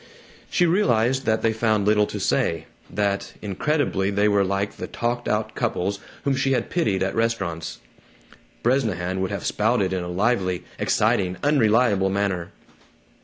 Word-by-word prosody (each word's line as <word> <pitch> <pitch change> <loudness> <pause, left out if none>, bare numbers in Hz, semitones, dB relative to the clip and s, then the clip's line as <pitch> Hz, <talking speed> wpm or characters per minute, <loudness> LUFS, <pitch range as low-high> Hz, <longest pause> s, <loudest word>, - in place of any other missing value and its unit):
She 175 - +2
realized 130 - +2
that 110 0 +1
they 115 - +2
found 110 -2 +1
little 105 0 +3
to - - -5
say; 80 -1 0 0.2
that, 100 -1 -1
incredibly, 105 - 0
they 100 +1 +2
were 100 -1 +3
like 100 +1 -2
the - - -5
talked 120 +1 -2
out 110 0 -1
couples 100 -4 -1 0.2
whom 140 -1 +1
she 135 +1 +1
had 120 -3 -1
pitied 105 - +1
at 95 - -1
restaurants. 115 -8 -2 0.9
Bresnahan 95 -8 0
would 95 - -1
have 100 - -4
spouted 105 -3 +1
in 90 -1 -1
a - - -5
lively, 95 -1 0 0.2
exciting, 90 -1 +1
unreliable 115 -8 +3
manner. 95 -3 -1
105 Hz, 150 wpm, -23 LUFS, 95-120 Hz, 0.9 s, little